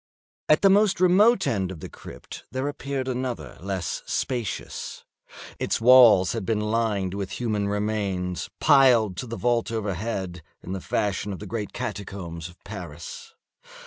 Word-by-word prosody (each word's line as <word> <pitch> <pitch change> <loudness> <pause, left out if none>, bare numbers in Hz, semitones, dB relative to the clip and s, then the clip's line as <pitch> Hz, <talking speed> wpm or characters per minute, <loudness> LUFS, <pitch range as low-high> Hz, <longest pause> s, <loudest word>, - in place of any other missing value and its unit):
At 155 - +5
the 195 - +7
most 205 -2 +4
remote 190 +4 +5
end 95 -5 0
of 95 -4 -7
the - - -7
crypt - - -11
there 130 +2 -2
appeared 140 -2 -3
another 125 -1 -4
less 95 -3 -3
spacious. 120 -5 -3 0.5
Its - - 0
walls 115 -6 +7
had 115 -3 -3
been 110 +2 0
lined 105 -3 0
with 100 -1 -4
human 105 -4 -1
remains, 100 -4 -2
piled 120 -8 +5
to 125 - -4
the 115 0 -5
vault 115 +3 +1
overhead, 100 -4 -3 0.2
in 90 - -7
the 95 -1 -3
fashion 100 +1 -1
of 95 - -5
the - - -8
great 110 -3 -4
catacombs 90 -5 -5
of 90 - -17
Paris. 85 -6 -9
105 Hz, 150 wpm, -25 LUFS, 95-125 Hz, 0.5 s, the